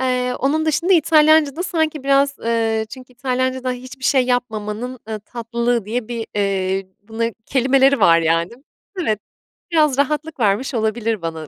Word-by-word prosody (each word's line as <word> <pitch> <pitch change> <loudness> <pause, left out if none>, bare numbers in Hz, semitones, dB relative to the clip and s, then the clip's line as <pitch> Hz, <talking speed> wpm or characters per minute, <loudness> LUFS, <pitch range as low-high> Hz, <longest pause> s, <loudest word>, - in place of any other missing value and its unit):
Eee, 250 -1 0
onun 310 +4 0
dışında 335 +5 +2
İtalyancada 315 -1 +4
sanki 315 -4 -1
biraz, 275 0 +2
eee 225 -1 0
çünkü 255 0 -11
İtalyancada 255 0 -2
hiçbir 255 +1 -8
şey 260 -2 +3
yapmamanın, 245 0 -2
eee, 220 -1 -3
tatlılığı 235 -1 -2
diye 225 +2 -3
bir, 235 -2 -4
eee, 195 -1 -1 0.2
buna 225 +2 -3 0.2
kelimeleri 270 0 +3
var, 165 -4 +6
yani. 165 +2 +1 0.5
Evet, 215 -9 0 0.5
biraz 300 -5 +3
rahatlık 300 +2 -1
vermiş 220 +5 +1
olabilir 220 -1 -1
bana 160 -2 -5
250 Hz, 140 wpm, -20 LUFS, 220-275 Hz, 0.5 s, var